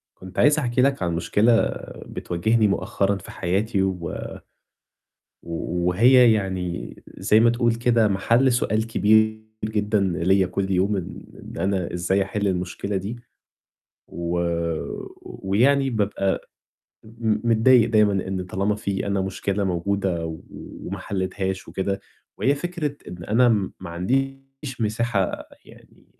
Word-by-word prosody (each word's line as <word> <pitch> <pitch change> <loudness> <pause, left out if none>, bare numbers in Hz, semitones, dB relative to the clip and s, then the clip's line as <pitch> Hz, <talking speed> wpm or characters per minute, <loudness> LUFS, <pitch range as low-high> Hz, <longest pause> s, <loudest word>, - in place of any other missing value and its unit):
كنت 95 0 -12
عايز 150 +1 +5
أحكي 125 -2 +1
لك 135 -5 +2
عن 85 -2 0
مشكلة 110 +7 +3 0.4
بتواجهني 110 +5 0
مؤخرًا 100 0 0
في - - -12
حياتي 95 +3 0
و 90 -3 -2 1.3
و 85 +1 -3
وهي 120 +6 +6
يعني 95 -4 -3 0.2
زي 110 - +4
ما 115 +1 +5
تقول 120 -1 +1
كده 115 -2 +2
مَحَل 115 +6 +2
سؤال 110 -2 0
كبير 110 0 +3 0.3
جدًا 105 -1 0
ليّا 95 +1 +2
كل 95 +2 -2
يوم 95 +2 +2
إن 95 - -6 0.2
إن - - -6
أنا 95 -2 -1
إزاي 95 +3 +1
أحِل 100 +1 -1
المشكلة 95 +2 -2
دي. 100 +5 -4 0.9
و 85 0 -3 0.9
ويعني 135 +8 +1
بابقى 100 -4 -1 0.6
م 115 +1 -1
متضايق 115 +1 +5
دايمًا 105 -2 +4 0.2
إن 95 -1 -3
طالما 100 +3 0
في 100 -1 -3
أنا 100 -1 0
مشكلة 100 +1 -2
موجودة 90 -1 -1
و 80 -1 -6
وما - - -8
حليتهاش 95 0 -3
وكده 100 +1 -2 0.4
وهي 140 - +2
فكرة 150 -2 -3
إن 85 -1 -8
أنا 120 +6 +4 0.3
ما 95 -2 -7
عنديش 135 - -3
مساحة 110 -3 -1 0.2
يعني - - -19
100 Hz, 130 wpm, -23 LUFS, 95-115 Hz, 1.3 s, وهي